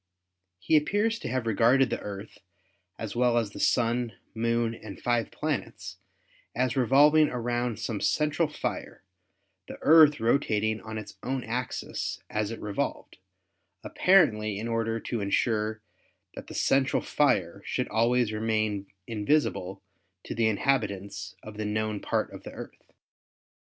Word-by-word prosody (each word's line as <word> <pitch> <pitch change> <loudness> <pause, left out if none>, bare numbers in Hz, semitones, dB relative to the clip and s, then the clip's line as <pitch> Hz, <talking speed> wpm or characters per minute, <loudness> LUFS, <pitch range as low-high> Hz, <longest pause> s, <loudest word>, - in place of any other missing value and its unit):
He 125 - +1
appears 210 +9 +1
to - - -6
have 125 -1 -2
regarded 120 +4 +3
the - - -1
Earth, 100 +1 -8 0.6
as 110 -1 -6
well 120 -1 +3
as 110 -4 0
the - - -9
Sun, 120 -1 +1 0.2
Moon 115 0 0
and 110 -3 -10
five 120 -1 0
planets, - - -4 0.6
as 125 +1 0
revolving 145 +4 +5
round 120 -2 -2
some 110 -4 -4
central 155 +2 +1
fire, 150 - -5 0.6
the - - -8
Earth 155 -2 +7
rotating 110 -3 +1
on 110 0 -7
its 110 - -9
own 130 0 -2
axis 125 +3 -3
as 105 -1 -1
it 115 - -6
revolved, 105 -1 -4 0.6
apparently 110 - +3
in 110 +3 -4
order 115 0 -1
to 115 -3 -3
insure 110 +1 0 0.5
that - - -9
the - - -9
central 135 0 +2
fire 95 - +1
should - - -2
always 115 0 +2
remain 110 -2 -1 0.2
invisible 105 -4 -1 0.4
to - - -5
the 115 -1 +2
inhabitants 100 -5 -1
of 105 -1 -10
the 110 - -3
known 105 0 -1
part - - -2
of - - -9
the - - -10
Earth. - - -11
115 Hz, 140 wpm, -28 LUFS, 105-130 Hz, 0.6 s, Earth